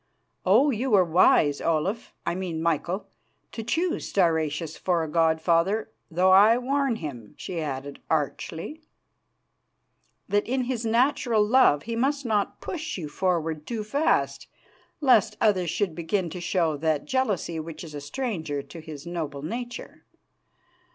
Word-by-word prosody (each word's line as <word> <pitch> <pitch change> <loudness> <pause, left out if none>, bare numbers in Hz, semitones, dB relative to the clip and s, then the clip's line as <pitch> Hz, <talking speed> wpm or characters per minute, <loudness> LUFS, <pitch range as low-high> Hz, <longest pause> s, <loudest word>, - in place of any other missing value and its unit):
Oh! 250 +10 +5
you 255 +3 -1
were 195 -5 +5
wise, 160 -3 +4
Olaf 165 +8 -1
I - - 0
mean 175 -3 -3
Michael 170 +4 -1 0.5
to 225 - -5
choose 330 +10 -1
Stauracius 160 -3 +1
for 175 -3 0
a - - -3
god 160 +1 +2
father, 185 +7 +1 0.2
though 180 +3 +3
I 210 +5 +7
warn 270 0 0
him," 130 - -8
she 175 -3 -4
added 140 -1 -5
archly, 160 - -2 1.5
"that 205 +1 +1
in 255 +2 0
his 240 -2 -2
natural 235 -2 +2
love 215 - +4
he 230 +1 -4
must 275 +3 0
not 210 -3 0
push 320 - -4
you 165 -5 -5
forward 160 -2 -1
too 225 -3 -3
fast 280 +9 0 0.5
lest 255 -8 +4
others 185 -6 +2
should 195 -2 -1
begin 170 +1 -2
to 180 - -6
show 170 -4 0
that 155 -1 0
jealousy 205 -10 -1
which 160 +1 -7
is 160 -3 -9
a 145 - -6
stranger 160 - -3
to 170 - -11
his 155 -3 -9
noble 155 -5 -4
nature. 240 +9 -6
180 Hz, 145 wpm, -26 LUFS, 160-230 Hz, 1.5 s, I